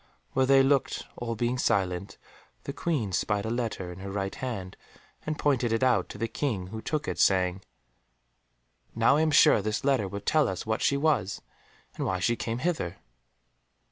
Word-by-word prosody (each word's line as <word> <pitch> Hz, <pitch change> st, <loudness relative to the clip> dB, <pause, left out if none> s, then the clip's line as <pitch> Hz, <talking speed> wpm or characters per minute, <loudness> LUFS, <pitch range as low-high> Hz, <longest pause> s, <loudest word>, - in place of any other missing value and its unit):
While 130 Hz, 0 st, +2 dB
they 135 Hz, 0 st, +6 dB
looked, 135 Hz, 0 st, +1 dB
all 115 Hz, -1 st, -4 dB
being 120 Hz, +3 st, -1 dB
silent, 95 Hz, -4 st, 0 dB, 0.5 s
the -, -, -5 dB
Queen 140 Hz, -, -1 dB
spied 100 Hz, +4 st, 0 dB
a 110 Hz, -, -2 dB
letter 115 Hz, -7 st, -3 dB
in 90 Hz, -, -10 dB
her 100 Hz, +1 st, -6 dB
right 95 Hz, 0 st, -3 dB
hand, 100 Hz, -8 st, -5 dB, 0.5 s
and 155 Hz, -1 st, -2 dB
pointed 130 Hz, -6 st, +1 dB
it 115 Hz, +3 st, +1 dB
out 130 Hz, -2 st, +2 dB
to -, -, -8 dB
the 115 Hz, -, -1 dB
King, 110 Hz, -8 st, -3 dB
who 110 Hz, -, -5 dB
took 155 Hz, +4 st, -2 dB
it -, -, -3 dB
saying, 95 Hz, -1 st, +3 dB, 1.3 s
"Now 115 Hz, +5 st, +4 dB
I -, -, +2 dB
am 160 Hz, -, +2 dB
sure 150 Hz, -5 st, +6 dB
this 105 Hz, +2 st, -2 dB
letter 135 Hz, -8 st, +2 dB
will 100 Hz, +1 st, -6 dB
tell 150 Hz, +8 st, +2 dB
us 95 Hz, -2 st, -4 dB
what 110 Hz, 0 st, -1 dB
she 140 Hz, -, +2 dB
was, 135 Hz, -9 st, 0 dB, 0.5 s
and -, -, -3 dB
why 95 Hz, -, 0 dB
she 115 Hz, +6 st, +1 dB
came 115 Hz, 0 st, -3 dB
hither." 125 Hz, -, -2 dB
115 Hz, 185 wpm, -28 LUFS, 95-135 Hz, 1.3 s, they